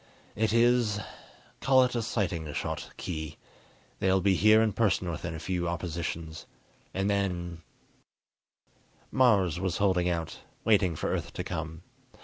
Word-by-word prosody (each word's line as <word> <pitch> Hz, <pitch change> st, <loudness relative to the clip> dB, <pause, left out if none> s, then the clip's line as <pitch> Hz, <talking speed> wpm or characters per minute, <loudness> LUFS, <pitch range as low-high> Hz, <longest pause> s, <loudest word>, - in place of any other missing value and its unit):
It 110 Hz, 0 st, +1 dB
is 115 Hz, -2 st, +3 dB, 0.6 s
call 130 Hz, -1 st, +5 dB
it 125 Hz, -, 0 dB
a 120 Hz, -, 0 dB
sighting 90 Hz, -9 st, -2 dB
shot, -, -, -3 dB
Khee. 80 Hz, -3 st, -5 dB, 0.6 s
They'll 95 Hz, 0 st, +3 dB
be 95 Hz, +1 st, +3 dB
here 110 Hz, +3 st, +6 dB
in 110 Hz, -2 st, +2 dB
person 95 Hz, -5 st, +1 dB
within 85 Hz, +1 st, -5 dB
a -, -, -6 dB
few 85 Hz, +2 st, -2 dB
oppositions. 85 Hz, -2 st, -4 dB, 0.4 s
And 95 Hz, +1 st, -1 dB
then 90 Hz, -4 st, -1 dB, 0.8 s
" -, -, -65 dB, 0.7 s
Mars 100 Hz, -, +3 dB
was 95 Hz, -2 st, -1 dB
holding 95 Hz, -3 st, +2 dB
out, 85 Hz, -2 st, -3 dB, 0.3 s
waiting 100 Hz, -6 st, +3 dB
for -, -, -2 dB
Earth -, -, -3 dB
to -, -, -4 dB
come. 80 Hz, +2 st, -5 dB
95 Hz, 140 wpm, -29 LUFS, 85-110 Hz, 0.8 s, here